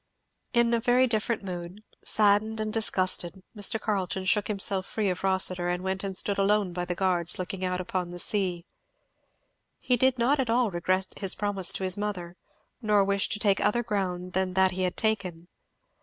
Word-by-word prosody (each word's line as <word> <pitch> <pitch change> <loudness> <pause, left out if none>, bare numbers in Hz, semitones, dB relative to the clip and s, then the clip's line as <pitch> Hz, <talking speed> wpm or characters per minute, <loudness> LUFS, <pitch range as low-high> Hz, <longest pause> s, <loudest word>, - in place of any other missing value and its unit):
In 235 -1 +2
a 235 - +2
very 245 +3 +3
different 225 -2 -1
mood, 180 +2 -7 0.2
saddened 215 +1 +2
and 215 0 -3
disgusted, 185 -4 0
Mr. 210 +1 0
Carleton 190 -3 -2
shook 205 +1 +2
himself 195 -2 +1
free 210 -4 -1
of 180 - -6
Rossitur 185 -2 +2
and 180 +1 -2
went 190 0 -2
and 195 -2 -3
stood 200 0 +1
alone 200 -2 +2
by 175 0 -3
the 180 0 -3
guards 175 -2 +1
looking 185 +1 -4
out 180 0 -1
upon 180 -1 -3
the 175 - -8
sea. 180 -2 0 1.1
He 250 -1 +1
did 260 +1 +2
not 260 +5 +2
at 255 -3 0
all 235 -2 +2
regret 185 +2 -1
his 195 -2 0
promise 195 -3 +1
to - - -4
his 185 +1 -1
mother, 180 -4 -4 0.5
nor 210 -3 +3
wish 200 0 +1
to - - +1
take 205 -2 +2
other 240 +3 +1
ground 185 -5 -3
than 185 -1 -1
that 190 0 +4
he 185 0 -4
had 180 -1 -1
taken. 190 -6 -2
195 Hz, 185 wpm, -27 LUFS, 185-215 Hz, 1.1 s, that